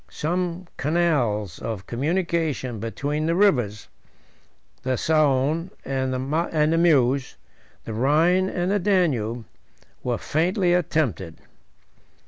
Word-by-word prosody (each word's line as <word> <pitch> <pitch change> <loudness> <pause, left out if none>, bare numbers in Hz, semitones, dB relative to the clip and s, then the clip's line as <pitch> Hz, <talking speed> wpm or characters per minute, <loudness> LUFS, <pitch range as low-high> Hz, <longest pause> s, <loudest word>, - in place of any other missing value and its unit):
Some 175 +2 -2
canals 130 - 0
of 105 -4 -5
communication 155 - -1
between 145 +8 -2
the 165 - +1
rivers, 125 - +2 0.9
the 130 -1 -1
Saone 155 +3 +1 0.2
and 130 -1 -1
the 155 +4 0
Meuse, 135 -6 +2 0.5
the 110 - -5
Rhine 160 - +3
and 180 0 -1
the 205 - +2
Danube, 135 - 0 0.6
were 120 -2 -1
faintly 175 - +1
attempted. 150 - -1
150 Hz, 100 wpm, -24 LUFS, 125-170 Hz, 0.9 s, Rhine